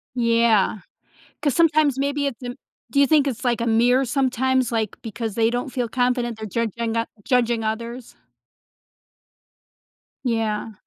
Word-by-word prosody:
Yeah, 230 -4 +3 0.6
'cause 285 -5 +1
sometimes 305 -5 +3
maybe 285 +1 0
it's 270 -3 -6
im 245 +1 -5 0.4
Do 280 - +2
you 280 - +5
think 300 -1 +4
it's, 260 -1 -3
like, 240 -1 +1
a - - 0
mirror 240 +3 +3
sometimes, 260 -1 +1
like, 220 -3 -2
because 225 -1 -5
they 225 0 +3
don't 245 +3 -2
feel 250 -2 -2
confident 245 -1 0
they're 220 - -6
judging 230 +2 -2
o 230 - +1 0.2
judging 235 -2 +1
others? 235 +3 -5 2.1
Yeah. 225 -2 -1
240 Hz, 145 wpm, -22 LUFS, 225-260 Hz, 2.1 s, you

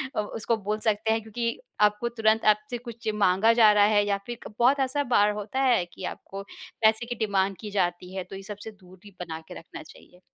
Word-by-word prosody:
अ, - - +1
उसको 225 +2 -2
बोल 210 +1 -3
सकते 220 0 +1
हैं 225 - -1
क्योंकि 230 +2 -3 0.2
आपको 210 +3 +3
तुरंत 225 -1 +1
आपसे 245 +4 -7
कुछ 235 -1 -10
माँगा 205 +3 +4
जा 215 -1 +8
रहा 205 - +5
है 205 0 +4
या 200 -1 +1
फिर 240 -1 -5
क - - -14
बहुत 265 +4 +4
ऐसा 270 +2 0
बार 210 -1 +5
होता 210 +5 -4
है 245 -9 +3
कि 185 - -10
आपको 195 0 -9 0.4
पैसे 220 +2 +3
की 240 0 -4
डिमांड 195 -1 0
की 210 -2 -7
जाती 180 -1 -1
है 190 - -3
तो 185 - -10
ये 195 - -8
सबसे 210 +2 -8
दूरी 190 0 -17
बना 165 -2 -5
के - - -8
रखना 165 - -11
चाहिए। 180 +3 -17
210 Hz, 220 wpm, -26 LUFS, 195-230 Hz, 0.4 s, जा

